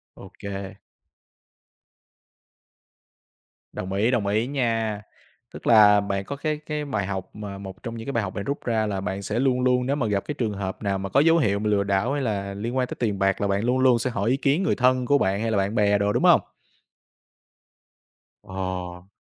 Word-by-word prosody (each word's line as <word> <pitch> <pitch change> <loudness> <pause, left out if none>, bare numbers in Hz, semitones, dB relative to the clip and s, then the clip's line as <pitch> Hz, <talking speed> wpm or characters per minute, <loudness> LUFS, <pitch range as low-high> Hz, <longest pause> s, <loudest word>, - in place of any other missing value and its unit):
Ô - - -12
kê. 100 -1 -6 3.0
Đồng 95 +1 -5
ý, 105 +5 +2
đồng 115 -6 0
ý 110 +4 +1
nha. 115 -6 -1 0.5
Tức - - -8
là 105 -2 +7
bạn 100 -1 -3
có 140 - -5
cái 155 +1 -2
cái 150 -1 -3
bài 110 -9 -2
học, 95 -1 -4
mà 105 -2 -7
một 95 +1 -10
trong 115 -1 -5
những 115 - -7
cái - - -1
bài 115 - 0
học 95 0 -5
bạn 100 - -4
rút 140 +5 -4
ra 110 -2 +1
là 100 -2 -2
bạn 95 +1 -3
sẽ 100 - -2
luôn 130 -1 +2
luôn, 125 0 +2
nếu 140 +2 0
mà 130 -6 -1
gặp 100 -2 0
cái 150 - -4
trường 115 -5 -1
hợp 95 -1 -5
nào 100 -1 0
mà 95 0 -5
có 135 - +3
dấu 165 +3 +5
hiệu 100 -10 +1
lừa 105 -1 +1
đảo 100 +6 0
hay 145 - -1
là 100 -5 -2
liên 115 +6 -4
quan 130 -1 +1
tới - - -6
tiền 105 -5 -1
bạc, 95 0 +1
là 100 - +1
bạn 100 +1 0
luôn 125 +2 +1
luôn 130 -2 +4
sẽ 130 - -1
hỏi 115 -2 -1
ý 130 - +2
kiến 140 +6 +1
người - - +1
thân 125 0 +2
của 145 +3 +4
bạn 100 -5 0
hay 115 0 -1
là 110 - +1
bạn 100 +3 0
bè 105 -2 +3
đồ, 100 0 +1
đúng - - 0
hông? - - +6 2.0
Ờ. 90 -1 -5
105 Hz, 220 wpm, -24 LUFS, 100-125 Hz, 3.0 s, là